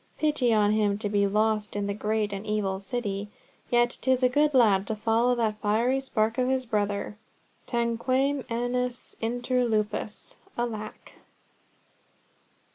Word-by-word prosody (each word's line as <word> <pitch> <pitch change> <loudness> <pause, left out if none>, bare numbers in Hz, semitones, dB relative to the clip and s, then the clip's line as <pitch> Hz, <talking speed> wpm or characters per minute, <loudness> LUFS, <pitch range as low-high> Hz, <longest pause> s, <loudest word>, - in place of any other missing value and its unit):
Pity 295 -6 +2
on 210 -2 +4
him 210 -2 +2
to 210 -1 -3
be 200 -1 +2
lost 210 +1 0
in 205 0 -1
the 200 - -1
great 210 0 -1
and 195 0 -5
evil 210 -3 -1
City! 205 -2 -3 0.4
Yet 240 0 +2
'tis 260 0 +2
a 250 - +5
good 295 +2 +2
lad 205 -6 +4
to 220 - -1
follow 230 +3 +2
that 215 -3 -1
fiery 230 +6 +2
spark 225 -3 -1
his 260 0 +1
brother. 205 -1 -2 0.5
Tanquam 255 +4 0
agnus 245 +1 -2
inter 245 +2 0
lupos. 215 -2 -2 0.2
Alack!" 220 -3 -5
225 Hz, 135 wpm, -27 LUFS, 210-245 Hz, 0.5 s, a